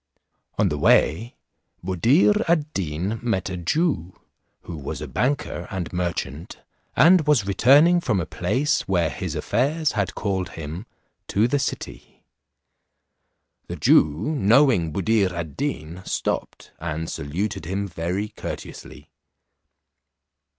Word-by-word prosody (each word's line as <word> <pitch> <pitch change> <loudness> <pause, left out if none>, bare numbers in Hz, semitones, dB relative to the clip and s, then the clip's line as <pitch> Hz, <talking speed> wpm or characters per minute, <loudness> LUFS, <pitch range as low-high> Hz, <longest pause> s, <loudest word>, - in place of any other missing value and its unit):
On - - +3
the - - -3
way 110 +10 +3 0.5
Buddir 135 - +3
ad 155 -3 +1
Deen 95 +5 -2
met 105 -6 -1
a 90 - -4
Jew, 95 - -1 0.4
who 85 - -8
was 70 -3 -6
a - - -6
banker 140 +2 -2
and 95 -5 -5
merchant, 85 -3 -4 0.4
and 160 +3 +5
was 140 -9 +3
returning 145 - +5
from 110 - 0
a 85 - -2
place 130 - -1
where 85 -5 +1
his - - -5
affairs 145 +7 0
had 100 -4 -2
called 95 -2 -2
him, 80 +7 -6 0.4
to 105 +4 +2
the 145 +3 0
city. 135 - -6 1.4
The - - -5
Jew, 75 - +3
knowing 115 - +4
Buddir 100 +2 +1
ad 85 -4 -5
Deen, 95 - -4
stopped, - - -3
and 80 0 -4
saluted 80 +6 -4
him 100 +4 -2
very 90 +4 -3
courteously. 75 -6 -9
100 Hz, 120 wpm, -23 LUFS, 85-135 Hz, 1.4 s, and